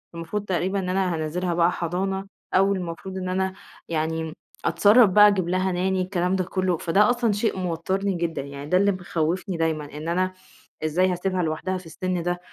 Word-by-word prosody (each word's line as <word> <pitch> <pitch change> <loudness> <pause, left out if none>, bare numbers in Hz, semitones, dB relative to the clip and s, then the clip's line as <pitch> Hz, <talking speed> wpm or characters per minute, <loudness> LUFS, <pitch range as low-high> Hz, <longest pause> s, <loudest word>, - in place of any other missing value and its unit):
المفروض 170 +5 -4
تقريبًا 190 +1 0
إن 185 -1 -3
أنا 185 -1 +1
هانزِّلها 170 +3 -2
بقى 170 +1 +3
حضانة، 190 +3 -2 0.3
أو 195 +1 +4
المفروض 185 +1 -5
إن 185 -1 -3
أنا 190 +1 0 0.4
يعني 160 0 -2 0.3
أتصرّف 205 +7 +6
بقى 210 +2 +8
أجيب 190 -4 +1
لها 185 +1 +1
Nanny - - -2 0.3
الكلام 180 0 0
ده 185 - +1
كلّه، 185 -1 0
فده 195 +6 +3
أصلًا 240 -3 +2
شيء 205 0 0
موتّرني 185 +3 -1
جدًا، 170 -3 -2
يعني 140 +1 -8
ده 180 - +4
اللي 200 +2 +4
مخوفني 180 0 -2
دايمًا، 160 -2 0
إن 155 +2 -6
أنا 185 +2 0 0.5
إزاي 180 +4 +2
هاسيبها 180 0 -1
لوحدها 160 +4 -2
في 185 - -11
السِن 180 +2 -3
ده؟ 175 +1 -1
180 Hz, 180 wpm, -24 LUFS, 165-190 Hz, 0.5 s, بقى